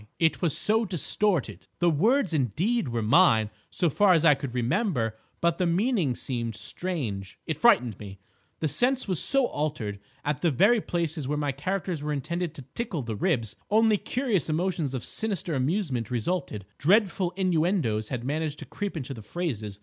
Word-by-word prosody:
"It 160 Hz, -1 st, +1 dB
was 170 Hz, -6 st, +2 dB
so 220 Hz, +2 st, +4 dB
distorted. 175 Hz, -, 0 dB
The 175 Hz, -1 st, +3 dB
words, 215 Hz, -, +2 dB
indeed, 155 Hz, -, 0 dB
were 115 Hz, -2 st, -2 dB
mine 110 Hz, -, +4 dB, 0.2 s
so 175 Hz, -, 0 dB
far 190 Hz, +5 st, +4 dB
as 165 Hz, -1 st, +3 dB
I 150 Hz, -, +8 dB
could 135 Hz, -2 st, -6 dB
remember, 125 Hz, -, 0 dB, 0.3 s
but 170 Hz, -1 st, +1 dB
the 180 Hz, -, +2 dB
meanings 180 Hz, -, +1 dB
seemed 115 Hz, -4 st, -3 dB
strange. 105 Hz, -, -4 dB
It 160 Hz, -, -2 dB
frightened 125 Hz, -, +3 dB
me. 100 Hz, -2 st, -9 dB, 0.4 s
The 160 Hz, -, +1 dB
sense 250 Hz, -, +1 dB
was 185 Hz, -5 st, +3 dB
so 275 Hz, -1 st, +5 dB
altered. 145 Hz, -, -3 dB, 0.3 s
At 150 Hz, 0 st, -1 dB
the 170 Hz, -, +3 dB
very 205 Hz, -, +4 dB
places 165 Hz, -6 st, -2 dB
where 150 Hz, +2 st, -1 dB
my 145 Hz, -1 st, 0 dB
characters 175 Hz, +3 st, -3 dB
were 150 Hz, 0 st, -2 dB
intended 170 Hz, +3 st, -3 dB
to 140 Hz, -, -9 dB
tickle 205 Hz, -, -3 dB
the 115 Hz, -2 st, -4 dB
ribs, 110 Hz, +1 st, -1 dB
only 220 Hz, 0 st, +4 dB
curious 230 Hz, -, -1 dB
emotions 160 Hz, -4 st, -1 dB
of 125 Hz, -, -4 dB
sinister 200 Hz, -6 st, -2 dB
amusement 135 Hz, -, -1 dB
resulted. 125 Hz, -, -2 dB
Dreadful 190 Hz, +1 st, +3 dB
innuendoes 165 Hz, -, 0 dB
had 125 Hz, -3 st, -4 dB
managed 150 Hz, +2 st, -2 dB
to -, -, -8 dB
creep 205 Hz, -4 st, -5 dB
into 135 Hz, -2 st, -5 dB
the 115 Hz, -, -9 dB
phrases. 110 Hz, -, -4 dB
155 Hz, 175 wpm, -27 LUFS, 125-185 Hz, 0.4 s, I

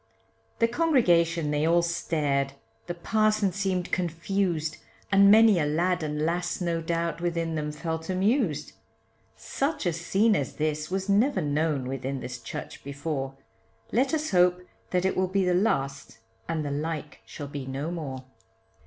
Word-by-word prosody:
The 230 Hz, -, +3 dB
congregation 175 Hz, -, +2 dB
they 150 Hz, 0 st, +1 dB
all 170 Hz, +2 st, +4 dB
stared, 150 Hz, -5 st, 0 dB, 0.3 s
the 175 Hz, -, -3 dB
parson 215 Hz, +2 st, +2 dB
seemed 185 Hz, -1 st, -2 dB
confused, 170 Hz, -2 st, -1 dB, 0.3 s
And 200 Hz, 0 st, +7 dB
many 215 Hz, -2 st, +7 dB
a 150 Hz, -, +1 dB
lad 175 Hz, +4 st, +1 dB
and 150 Hz, -1 st, -2 dB
lass 175 Hz, +1 st, -1 dB
no 170 Hz, -2 st, -1 dB
doubt, 170 Hz, +1 st, -2 dB
within 170 Hz, -1 st, -1 dB
them 150 Hz, -1 st, -2 dB
felt 160 Hz, +2 st, -4 dB
amused; 190 Hz, -, +1 dB, 0.7 s
Such 275 Hz, -4 st, -2 dB
a 175 Hz, -, +1 dB
scene 195 Hz, +6 st, +2 dB
as 140 Hz, -8 st, -2 dB
this 155 Hz, 0 st, -1 dB
was 190 Hz, +1 st, -2 dB
never 225 Hz, +8 st, +3 dB
known 150 Hz, -2 st, 0 dB
within 135 Hz, +1 st, -3 dB
this 125 Hz, -1 st, -6 dB
church 115 Hz, -, -7 dB
before, 140 Hz, -1 st, -4 dB, 0.6 s
Let 260 Hz, +4 st, +2 dB
us 310 Hz, -1 st, -1 dB
hope 180 Hz, 0 st, +3 dB, 0.2 s
that 180 Hz, 0 st, 0 dB
it 190 Hz, -, +1 dB
will 185 Hz, 0 st, +1 dB
be 190 Hz, +1 st, +1 dB
the 180 Hz, -, +2 dB
last, 140 Hz, -, 0 dB, 0.3 s
and 160 Hz, -2 st, -1 dB
the 145 Hz, -, -2 dB
like 150 Hz, +1 st, -4 dB
shall 145 Hz, -, -7 dB
be 140 Hz, -2 st, -6 dB
no 140 Hz, +5 st, -3 dB
more. 140 Hz, -7 st, -5 dB
170 Hz, 155 wpm, -27 LUFS, 150-190 Hz, 0.7 s, And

